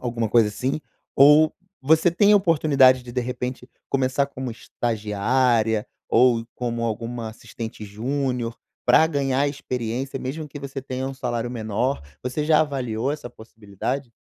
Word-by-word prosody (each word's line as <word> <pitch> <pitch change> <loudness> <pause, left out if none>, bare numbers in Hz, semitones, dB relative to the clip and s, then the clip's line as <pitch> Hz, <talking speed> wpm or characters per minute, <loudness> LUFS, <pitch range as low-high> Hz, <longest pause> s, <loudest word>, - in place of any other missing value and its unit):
alguma 115 -3 -2
coisa 115 -1 +4
assim? 130 +8 -2 0.4
Ou 150 +3 +7 0.3
você 160 +4 +4
tem 205 +4 +4
a - - +8
oportunidade 145 -8 +4
de, 120 -1 -10
de 125 - 0
repente, 125 +1 -5 0.2
começar 135 +1 +1
como 130 -2 -6
estagiária 110 0 0 0.2
ou 120 -1 +4
como 120 -1 -3
alguma 115 +1 -3
assistente 110 0 -8
júnior 120 +2 -2 0.3
pra 125 +6 +6
ganhar 140 -2 0
experiência, 130 -1 -4
mesmo 150 +5 -5
que 145 - -8
você 140 -1 -6
tenha 130 0 -4
um 135 - -5
salário 120 -2 -3
menor. 115 - -2 0.2
Você 130 +4 -2
já 155 0 +4
avaliou 130 -4 -1
essa 150 -5 -6
possibilidade? 115 +3 -6
125 Hz, 145 wpm, -23 LUFS, 115-140 Hz, 0.4 s, a